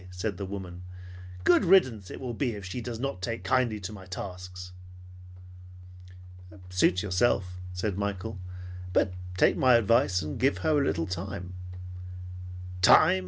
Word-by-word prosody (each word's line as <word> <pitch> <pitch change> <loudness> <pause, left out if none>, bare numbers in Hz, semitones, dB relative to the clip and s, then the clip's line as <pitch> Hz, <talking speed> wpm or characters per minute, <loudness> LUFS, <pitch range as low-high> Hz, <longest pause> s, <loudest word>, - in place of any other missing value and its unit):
said 90 +2 -3
the 100 - -4
woman. 95 -3 -6 0.6
"Good 175 - +5
riddance 130 - +4
it - - -7
will 125 -2 -4
be 120 -1 -1
if 100 -2 -7
she 95 +7 -4
does 115 -1 -5
not 135 -7 -3
take 115 +3 -3
kindly 120 -5 +2
to 95 +3 -5
my 95 -3 -10
tasks." 90 -1 -7 2.0
"Suit 90 0 +3
yourself," 95 -2 +1
said 95 +2 -2
Michael; 100 0 -3 0.5
"but 90 - +3 0.2
take - - +5
my 130 -2 +6
advice 115 - +3
and 75 -1 -5
give 135 +2 +3
her 155 -2 +4
a - - +2
little 85 -11 0
time." 90 +1 -5 1.3
"Time!" 95 +1 +7
100 Hz, 145 wpm, -28 LUFS, 90-120 Hz, 2.0 s, Time